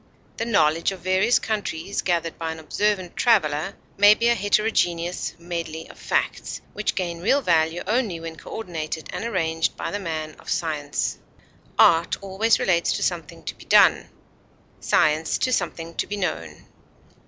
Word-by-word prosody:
The 230 - -2
knowledge 165 -6 +2
of 190 - -8
various 190 +6 +3
countries 200 -4 -3
gathered 170 -2 -1
by 165 -1 -2
an 160 - -7
observant 185 +3 -1
traveler 195 -6 +2 0.2
may 205 +1 +7
be 235 +2 +2
a - - +5
heterogeneous 190 -5 0
medley 170 -2 -5
of - - -19
facts, - - -1
which 210 - -2
gain 170 -3 -3
real 270 +9 +2
value 165 -2 +2
only 215 -4 0
when 165 0 -7
coordinated 160 -5 -6
and - - -4
arranged 165 -7 -1
by - - -4
the 205 - -2
man 155 -4 -4
of - - -11
science. 150 -4 -2 0.6
Art 165 +1 +5
always 200 +4 +1
relates 170 -2 +2
to - - -2
something 170 -2 -3
to - - -4
be - - -16
done, - - +5 0.7
science 155 +1 +2
to 255 - 0
something 170 -4 -2
to - - -1
be 205 - -4
known. 85 - -4
175 Hz, 155 wpm, -24 LUFS, 160-205 Hz, 0.7 s, may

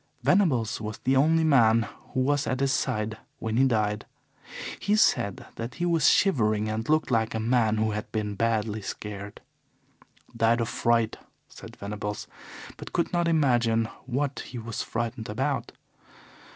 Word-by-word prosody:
Venables 125 - +2
was 110 +1 -5
the 130 +1 +2
only 160 +4 +4
man 115 -7 +5 0.3
who 130 - +2
was 145 -1 +1
at 130 +2 -1
his 135 0 +2
side 110 -5 -1 0.2
when 110 0 -3
he 130 +3 +4
died. 105 -4 0 0.7
He 205 +2 +1
said 100 - +2
that 115 +2 -5
he 175 - -2
was 165 -3 +4
shivering 110 - +2
and 110 +3 -3
looked 155 -2 +2
like 110 -1 +1
a - - -1
man 110 -1 +2
who 110 0 +1
had 105 0 -5
been 105 -2 -2
badly 110 0 0
scared. 100 0 -7 0.9
'Died 115 +1 +3
of 115 - -1
fright,' 115 -2 +1 0.3
said - - -12
Venables, 105 0 -5 0.5
but - - -9
could 170 - 0
not 175 -1 +2
imagine 120 -8 +3 0.2
what 135 +2 -1
he 125 - -7
was 115 -1 -4
frightened 115 0 -4
about. - - -2
115 Hz, 155 wpm, -27 LUFS, 110-135 Hz, 0.9 s, man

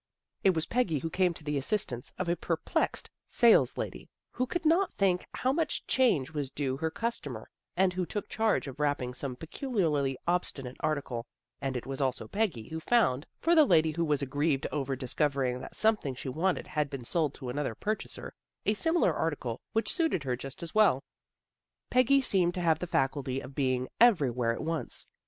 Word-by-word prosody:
It 190 -3 +4
was 160 - 0
Peggy 230 -11 +1
who 160 +4 -4
came 185 0 +2
to - - -9
the 150 -1 -1
assistance 135 - -1
of 185 - -2
a 170 - +2
perplexed - - -1
" - - -60
saleslady 235 -2 +3
" - - -61
who 255 - -1
could 345 +4 -3
not 345 +5 +4
think 185 -2 +1
how 260 +1 0
much 320 0 -1
change 195 - +2
was 145 -3 -2
due 135 -1 -2
her 160 +2 -1
customer, 160 - -4 0.3
and 185 0 +3
who 185 0 -1
took 205 - -4
charge 220 -8 +1
of 135 +1 -8
wrapping 145 -4 0
some 130 0 -4
peculiarly 160 - -1
obstinate 140 -7 -1
article, 130 -6 -2 0.3
and 135 -2 -1
it 120 - -6
was 135 +1 -4
also 130 -2 -1
Peggy 190 - -1
who 160 - -4
found, 160 - +2
for 335 - +2
the 315 -2 +8
lady 160 - +4
who 170 +2 -1
was 150 -3 +1
aggrieved 145 +1 0
over 135 -2 -1
dis 130 -1 -5
covering 135 -4 +1
that - - -9
something 215 -12 +2
she 130 - -5
wanted 170 +7 0
had 150 -2 -1
been 135 -4 -6
sold 155 0 0
to 130 -3 -6
another 135 -3 -2
purchaser, 215 - -4 0.3
a 210 - +4
similar 325 +10 +2
article 140 -8 -2
which 225 - +1
suited 320 - +1
her 125 -2 -1
just 135 +5 -8
as 165 - -7
well. 205 -11 +4 0.9
Peggy 255 +2 +5
seemed 180 -7 +2
to 180 - -2
have 160 -2 +3
the 180 - -4
faculty 135 -3 0
of 135 +1 -9
being 130 -2 0
every 195 - +5
where 120 -1 0
at 115 - -4
once. 165 0 -3
155 Hz, 195 wpm, -30 LUFS, 135-200 Hz, 0.9 s, the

